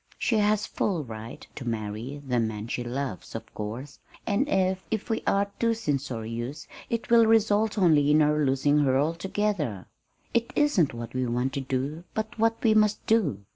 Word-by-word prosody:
She 225 -3 +1
has 210 0 +2
full 175 -7 -1
right 115 -2 -8
to 135 - -7
marry 115 +4 -4
the 125 -2 +1
man 110 -1 -2
she 120 - -3
loves, 120 -4 -5
of - - -7
course, 115 +7 -6 0.3
and 230 +8 +1
if 190 -2 +1
if 220 +1 -2
we 220 - 0
are 200 0 +2
too 230 -1 +2
censorious, 130 - -3 0.2
it 230 0 -3
will 230 -1 +7
result 220 -1 +3
only 155 -7 +4
in 150 +1 +5
our 150 0 +2
losing 140 +2 +2
her 135 -3 +3
altogether. 165 - -1 0.5
It 235 0 +1
isn't 205 - +2
what 115 0 -7
we 130 -1 -1
want 125 +3 -1
to 140 - -2
do, 135 +5 -3
but 220 +1 -4
what 225 0 +1
we 220 - +5
must 215 -1 +2
do. 160 - +1
150 Hz, 175 wpm, -27 LUFS, -, 0.5 s, will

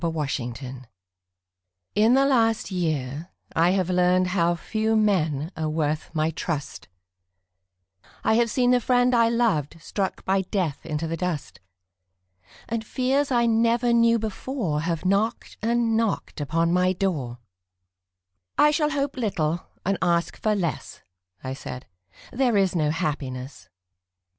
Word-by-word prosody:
Red 165 -1 -1
Maples 130 -3 -4 1.1
In 220 +4 +4
the 270 +1 +4
last 225 -6 +2
year 155 -3 -2 0.3
I 165 +2 +4
have 185 -1 +1
learned 180 0 +3
How 175 -2 +2
few 220 +6 -1
men 165 -8 +1
are 155 -1 -2
worth 155 -1 -1
my 155 +1 +1
trust; 150 -3 -4 1.4
I - - +3
have 235 +1 +3
seen 245 +2 +2
the 250 -1 +4
friend 245 +1 +3
I 230 -1 +4
loved 215 - 0
Struck 190 +4 -3
by 190 0 +2
death 180 -6 -3
into 155 0 -2
the 165 +1 -3
dust, 150 - -4 1.1
And 230 -1 -2
fears 265 +5 0
I 240 -2 +3
never 235 +1 +2
knew 230 0 +4
before 215 - -3
Have 165 +1 -2
knocked 205 +5 0
and 230 0 +1
knocked 220 -8 -1
upon 165 +4 +1
my 180 +1 +3
door 155 -11 -2 1.2
"I 300 - +6
shall 300 0 +1
hope 280 -2 -2
little 175 -8 -1 0.2
and 195 +1 0
ask 170 -1 +1
for 215 -1 0
less," 175 -6 -4 0.4
I 130 0 -4
said, 130 -2 -8 0.5
"There 245 -4 +2
is 190 -2 +2
no 155 -3 +2
happiness." 130 -8 -4
185 Hz, 140 wpm, -25 LUFS, 155-230 Hz, 1.4 s, I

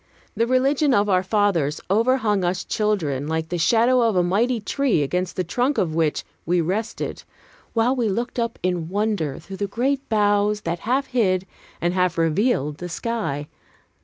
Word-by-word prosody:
The 230 - +1
religion 270 +2 +3
of 205 +1 +2
our 185 -2 +3
fathers 190 -7 +1
overhung 220 -1 +2
us 180 +1 -1
children 160 -11 -1
like 160 0 -2
the 175 - -2
shadow 235 +8 +4
of 225 -3 +2
a 180 - +3
mighty 225 +7 +1
tree 220 - +1
against 180 +5 -2
the 185 - 0
trunk 250 - 0
of 160 -4 0
which 160 -2 0 0.2
we 175 +2 +1
rested, 200 +7 -2 0.5
while 235 +3 +2
we 235 -4 0
looked 240 +5 -2
up 235 0 -2
in 175 -3 -1
wonder 200 -8 -1
through 190 +4 -9
the 200 - -2
great 265 +6 -1
boughs 205 -1 +2
that 170 -1 -3
half 270 +2 +2
hid 190 -8 +1 0.3
and 175 +1 0
half 180 -2 +1
revealed 165 - +1
the 180 - -5
sky. 165 -7 -3
205 Hz, 170 wpm, -23 LUFS, 175-230 Hz, 0.5 s, shadow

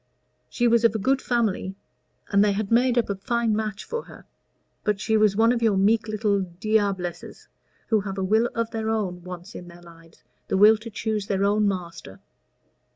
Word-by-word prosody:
She 240 - +1
was 235 0 +3
of 230 -1 +3
a - - +2
good 265 +6 +1
family, 215 -5 -1 0.5
and 200 0 +4
they 205 -1 +2
had 205 +1 -3
made 245 +1 +3
up 235 - +2
a 200 - -1
fine 225 +3 -1
match 215 -1 -3
for 470 0 -5
her. - - -14 0.6
But 210 -2 0
she 220 +1 0
was 215 -2 +3
one 225 +2 +4
of 240 -1 -1
your 220 -4 +2
meek 215 +4 +2
little 210 -2 0 0.2
diablesses, 200 -4 -2 0.4
who 220 -2 +3
have 195 -1 -6
a 190 - -1
will 220 +5 +2
of 230 0 -2
their 220 -1 -3
own 190 -6 -2
once 180 +3 -9
in 175 - -9
their 175 0 -14
lives 165 -1 -18 0.2
the - - 0
will 215 +3 +7
to 225 +2 -9
choose 215 -2 -3
their 200 -2 0
own 210 +1 +2
master." 175 - -5
210 Hz, 200 wpm, -24 LUFS, 195-225 Hz, 0.6 s, will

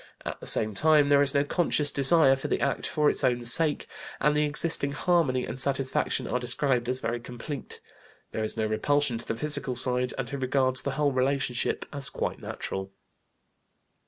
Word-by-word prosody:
At - - -5
the - - -10
same 110 0 +4
time 150 +5 +3
there 140 0 +5
is 140 0 0
no 140 - +3
conscious 150 -2 +1
desire 140 0 +4
for 135 - -5
the - - -1
act 140 - -1
for 150 -1 +1
its - - +2
own 125 -2 +1
sake, 150 +6 +1 0.3
and 150 0 +2
the 150 0 +2
existing 145 -1 +2
harmony 145 -6 +1
and 130 - -5
satisfaction 135 -1 0
are 125 - -1
described 125 0 -1
as 130 0 -1
very 120 -1 -3
complete. 125 +3 -8 0.5
There 110 - -3
is 110 - -3
no 110 - 0
repulsion 125 +3 0
to - - -8
the 115 - -2
physical 145 -2 0
side, 125 0 +2
and 135 -2 -3
he 140 - -5
regards 130 0 0
the 140 - -3
whole 145 -1 +2
relationship 130 -1 -1
as 140 -2 -4
quite - - -4
natural. 95 0 -6
135 Hz, 190 wpm, -27 LUFS, 125-145 Hz, 0.5 s, there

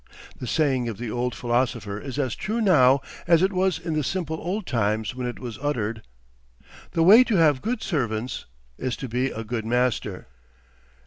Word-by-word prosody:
The 125 - -5
saying 130 -4 +1
of 110 - -6
the 115 -1 -5
old 125 +1 -2
philosopher 120 -4 -1
is 135 +3 -7
as 130 -5 0
true 220 +4 -2
now 140 - +5 0.3
as 170 0 +5
it 195 +1 +2
was 185 0 +1
in 170 -2 -4
the 155 -1 0
simple 160 0 -2
old 190 +4 -3
times 110 -3 0
when 125 -1 -4
it 120 - -5
was 120 -4 -7
uttered: 115 -6 -2 0.9
"The 165 - +2
way 215 +8 +9
to 225 - 0
have 150 -6 +4
good 230 0 -2
servants 120 - -2 0.3
is 130 -2 -2
to 135 - -6
be 125 +3 0
a 115 - -5
good 115 0 -3
master." 125 +1 -1
130 Hz, 185 wpm, -25 LUFS, 120-165 Hz, 0.9 s, way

